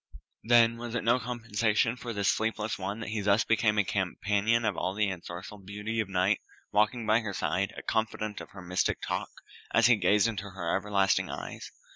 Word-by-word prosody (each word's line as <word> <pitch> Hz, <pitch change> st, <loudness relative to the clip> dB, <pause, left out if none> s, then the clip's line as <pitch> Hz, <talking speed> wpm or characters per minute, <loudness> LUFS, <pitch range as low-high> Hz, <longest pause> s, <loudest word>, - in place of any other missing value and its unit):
Then 115 Hz, 0 st, +5 dB
was 120 Hz, 0 st, -6 dB
it 120 Hz, -, -1 dB
no 120 Hz, +3 st, +3 dB
compensation 115 Hz, -2 st, 0 dB
for 125 Hz, -2 st, -6 dB
this 100 Hz, -3 st, -1 dB
sleepless 110 Hz, 0 st, 0 dB
one 100 Hz, +3 st, -4 dB
that 110 Hz, -, -5 dB
he 110 Hz, -1 st, -2 dB
thus 100 Hz, +2 st, +3 dB
became 110 Hz, -1 st, +2 dB
a 105 Hz, -, +4 dB
companion 100 Hz, +4 st, 0 dB
of 105 Hz, -, +1 dB
all 95 Hz, -, -2 dB
the 105 Hz, -2 st, +1 dB
ensorceled 95 Hz, +2 st, -8 dB
beauty 105 Hz, +3 st, -3 dB
of 110 Hz, -3 st, -1 dB
Night, 95 Hz, +2 st, +2 dB, 0.3 s
walking 105 Hz, +3 st, +2 dB
by 110 Hz, +1 st, +4 dB
her 110 Hz, -4 st, -4 dB
side, 95 Hz, +3 st, 0 dB
a -, -, -7 dB
confidant 110 Hz, -1 st, -2 dB
of -, -, -10 dB
her 95 Hz, -2 st, -11 dB
mystic 90 Hz, +1 st, 0 dB
talk, -, -, -3 dB, 0.5 s
as 115 Hz, -, +5 dB
he 120 Hz, 0 st, +7 dB
gazed 105 Hz, 0 st, +3 dB
into 105 Hz, -3 st, -4 dB
her 90 Hz, -3 st, -2 dB
everlasting 100 Hz, -1 st, +1 dB
eyes? -, -, -6 dB
105 Hz, 195 wpm, -29 LUFS, 100-115 Hz, 0.5 s, he